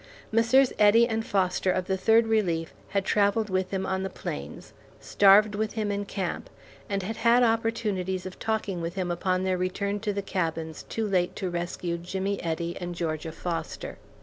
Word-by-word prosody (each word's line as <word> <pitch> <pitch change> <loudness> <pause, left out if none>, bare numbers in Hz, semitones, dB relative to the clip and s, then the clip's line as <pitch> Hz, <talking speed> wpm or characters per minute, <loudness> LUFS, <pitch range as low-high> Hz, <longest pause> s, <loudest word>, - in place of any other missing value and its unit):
Messrs. 235 +4 +4
Eddy 220 +3 +6
and 225 -1 -1
Foster 185 -2 +1
of 180 0 -1
the 190 - 0
Third 225 +4 +4
Relief 180 -8 0 0.2
had 195 -1 0
travelled 205 +1 +2
with 185 0 0
him 190 -1 -2
on 190 0 -1
the 190 - -2
plains, - - -7 0.3
starved 205 +1 +5
with 215 +1 -2
him 215 -2 -1
in 200 0 -2
camp, 190 -3 -4 0.4
and 200 -1 -1
had 220 +4 -4
had 235 +2 +4
opportunities 220 -5 0
of 185 - -8
talking 215 -5 -2
with 170 +2 -4
him 185 -2 -1
upon 185 +1 0
their 185 -1 0
return 200 +3 -1
to 210 0 -1
the 200 0 -3
cabins 165 -4 -3
too 225 -1 -3
late 180 -3 +1
to 185 -3 -3
rescue 175 0 -3
Jimmy 190 +3 -3
Eddy 170 +1 -2
and 175 0 -4
Georgia 160 -1 -3
Foster. 165 +1 -5
190 Hz, 180 wpm, -27 LUFS, 180-215 Hz, 0.4 s, Eddy